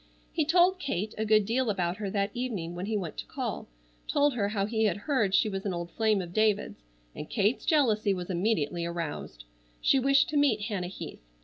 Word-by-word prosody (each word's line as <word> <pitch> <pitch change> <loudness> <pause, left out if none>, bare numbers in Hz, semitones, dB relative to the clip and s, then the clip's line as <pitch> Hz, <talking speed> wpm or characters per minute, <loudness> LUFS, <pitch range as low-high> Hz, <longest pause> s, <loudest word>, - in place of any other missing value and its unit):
He 315 - +1
told 360 +3 +4
Kate 215 - -2
a 220 - -2
good 215 -1 +4
deal 240 +3 0
about 180 -3 -1
her 205 -2 -3
that 200 +1 -1
evening 215 -9 -3
when 180 +3 -5
he 220 -1 0
went 175 -6 -5
to - - -5
call, - - -4 0.4
told 290 0 +2
her 205 -4 0
how 200 -2 0
he 220 +1 0
had 205 -3 +1
heard 205 -4 +1
she 215 - +4
was 195 -2 -3
an 195 -3 -2
old 170 0 -5
flame 215 -2 +1
of 175 0 -9
David's, 210 - +1 0.3
and 150 - -7
Kate's 210 +2 0
jealousy 225 -9 +3
was 180 -2 -3
immediately 175 -3 0
aroused. 165 - -5 0.4
She 270 - +3
wished 275 +3 +4
to 305 - 0
meet 270 -7 +3
Hannah 200 -4 -3
Heath. 185 - -8
210 Hz, 210 wpm, -29 LUFS, 185-240 Hz, 0.4 s, told